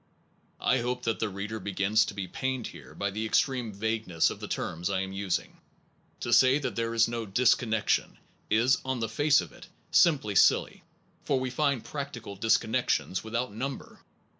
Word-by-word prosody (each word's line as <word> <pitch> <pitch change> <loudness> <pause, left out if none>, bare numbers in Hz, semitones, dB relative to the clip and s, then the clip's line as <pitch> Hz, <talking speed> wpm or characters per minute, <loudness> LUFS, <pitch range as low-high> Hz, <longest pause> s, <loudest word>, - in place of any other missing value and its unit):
I - - +2
hope 125 +1 -2
that 115 -2 -1
the 110 - 0
reader 105 +3 -5
begins 100 +2 +1
to - - -7
be 100 -2 -4
pained 130 +4 -3
here - - -10
by 100 0 -2
the 110 +3 -3
extreme 120 +1 +1
vagueness 105 -4 0
of - - -8
the - - -6
terms 85 +2 -3
I 95 -1 0
am 95 0 -5
using. 95 -2 -2 0.6
To 120 - -1
say 130 +4 +6
that 145 - -3
there 115 0 -2
is 115 0 +4
no 115 -1 -4
disconnec 115 0 +2
tion/ - - +1 0.3
is 120 +4 +3
on 130 -1 -2
the 115 - -1
face 145 +7 +3
of - - -9
it - - -14 0.2
simply 160 - +4
silly, - - +3 0.4
for 135 -2 +1
we 130 -1 -3
find 140 -2 0
practical 135 -8 -6
disconnections 100 -3 +1
without 115 +1 -3
number. 135 +5 -6
115 Hz, 180 wpm, -28 LUFS, 100-130 Hz, 0.6 s, say